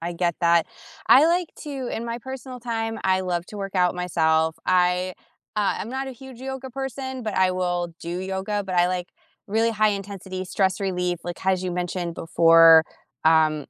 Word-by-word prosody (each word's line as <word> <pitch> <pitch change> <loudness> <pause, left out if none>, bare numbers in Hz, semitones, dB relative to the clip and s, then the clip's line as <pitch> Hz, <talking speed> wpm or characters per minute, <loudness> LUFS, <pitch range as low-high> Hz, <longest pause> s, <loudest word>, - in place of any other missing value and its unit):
I 170 +1 -4
get 170 -1 -1
that. 170 -1 +4 0.4
I 290 +4 +8
like 345 0 +1 0.2
to 270 -4 -5
in 230 - -4
my 235 0 -4
personal 260 0 -8
time, 225 -1 -3
I 190 0 +2
love 175 -2 -2
to 210 - -10
work 195 -1 -5
out 180 -1 +2
myself, 160 -2 +1
I, 180 0 +2 0.4
uh 205 -1 +1
I'm 215 - -5
not 265 +1 -3
a 265 - -6
huge 260 0 -12
yoga 265 0 -6
person, 265 0 -5
but 215 - -3
I 185 0 +3
will 175 -2 -2
do 170 +2 -4
yoga, 190 +2 -2
but 185 -2 -3
I 175 - +5
like 180 0 -3 0.4
really 225 +2 +2
high 215 0 +3
intensity 195 -2 -5
stress 190 +1 0
relief, 180 -3 -1
like, 175 +1 -6
as 190 -1 +1
you 180 - -2
mentioned 175 -1 -3
before 165 -1 +6 0.4
um, 155 -2 +3
185 Hz, 190 wpm, -24 LUFS, 175-230 Hz, 0.4 s, I